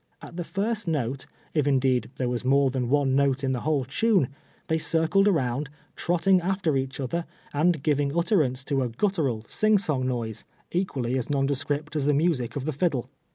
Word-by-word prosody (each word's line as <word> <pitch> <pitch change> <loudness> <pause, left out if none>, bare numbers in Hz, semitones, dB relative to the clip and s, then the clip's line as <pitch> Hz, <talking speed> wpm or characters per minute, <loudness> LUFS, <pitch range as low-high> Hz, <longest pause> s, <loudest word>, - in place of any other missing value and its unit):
At - - -11
the 175 - -3
first 205 +3 -2
note, 135 -4 -2 0.3
if 150 -3 +1
indeed 130 -2 +2
there 130 - -1
was 120 0 -2
more 135 +1 +3
than 125 -2 -2
one 140 -1 +2
note 140 -1 +2
in 135 - +1
the 130 - -1
whole 145 -1 0
tune, 185 - +2 0.4
they 160 0 0
circled 165 +6 +3
around, 140 -6 0 0.3
trotting 180 +2 +2
after 190 -2 0
eacli 135 0 -2
other, 165 +6 -2 0.3
and 155 0 +2
giving 145 0 +1
utterance 155 - +1
to 135 -1 0
a 125 - -1
guttural, 135 - -1
sing 215 0 +3
song 150 -9 0
noise, 115 -4 -2 0.3
equally 130 -9 -1
as 125 - -4
nondescript 145 +2 -1
as 145 -2 0
the 150 - +3
music 145 -6 0
of 140 -2 -3
the 155 - -1
fiddle. 140 -4 -1
145 Hz, 185 wpm, -26 LUFS, 130-170 Hz, 0.4 s, more